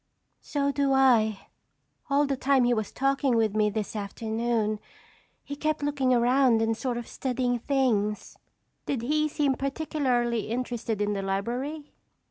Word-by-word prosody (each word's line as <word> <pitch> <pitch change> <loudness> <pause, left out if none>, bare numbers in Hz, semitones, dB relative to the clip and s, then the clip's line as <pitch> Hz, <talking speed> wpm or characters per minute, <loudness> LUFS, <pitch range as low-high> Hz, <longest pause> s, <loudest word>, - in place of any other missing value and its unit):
"So 280 -1 -1
do 280 -1 +1
I. 230 -6 +3 0.6
All 285 +1 +3
the 275 -1 -1
time 265 0 +2
he 245 0 +3
was 220 -3 -2
talking 275 -1 +1
with 220 -2 +1
me 215 -1 +3
this 215 0 -4
afternoon, 220 +1 -2 0.6
he 285 - -6
kept 310 0 -1
looking 285 -3 +1
around 245 0 +4
and 225 0 +1
sort 245 0 -3
of 240 - -6
studying 250 -2 -1
things." 230 -6 0 0.5
"Did 260 -5 -2
he 305 +4 +1
seem 290 -2 +1
particularly 260 -5 -1
interested 235 -3 -2
in 205 0 0
the 200 - -2
library?" 245 +10 -3
245 Hz, 145 wpm, -27 LUFS, 220-275 Hz, 0.6 s, around